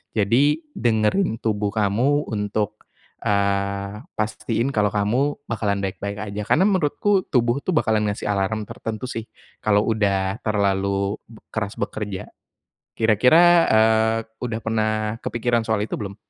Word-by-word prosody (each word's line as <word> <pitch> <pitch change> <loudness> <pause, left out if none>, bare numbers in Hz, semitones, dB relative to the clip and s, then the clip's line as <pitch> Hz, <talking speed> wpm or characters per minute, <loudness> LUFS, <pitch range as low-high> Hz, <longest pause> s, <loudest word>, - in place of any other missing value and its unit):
Jadi 135 +9 +3
dengerin 115 - +1
tubuh 105 -2 0
kamu 115 +8 +1
untuk, 105 0 -3 0.4
eee, 100 +1 -1
pastiin 110 +2 -1
kalau 105 -1 +3
kamu 120 +8 +1
bakalan 105 -3 -1
baik-baik 100 +2 -4
aja. 100 +1 -4
Karena 190 - +4
menurutku 190 +1 +1
tubuh 120 0 +2
tuh - - -1
bakalan 110 -7 +2
ngasih 105 - -5
alarm 105 +2 -1
tertentu 110 +1 -5
sih 115 -3 -5 0.4
kalau 105 0 +2
udah 100 -2 +1
terlalu 100 -1 0 0.4
keras 100 -1 -3
bekerja. 100 -3 -4 0.7
Kira-kira, 115 - +5 0.3
eee, 110 0 +4 0.2
udah 115 -2 -3
pernah 110 -1 0 0.3
kepikiran 120 0 0
soal 105 -2 +1
itu - - -4
belum? 100 -2 -6
110 Hz, 125 wpm, -22 LUFS, 100-115 Hz, 0.7 s, Kira-kira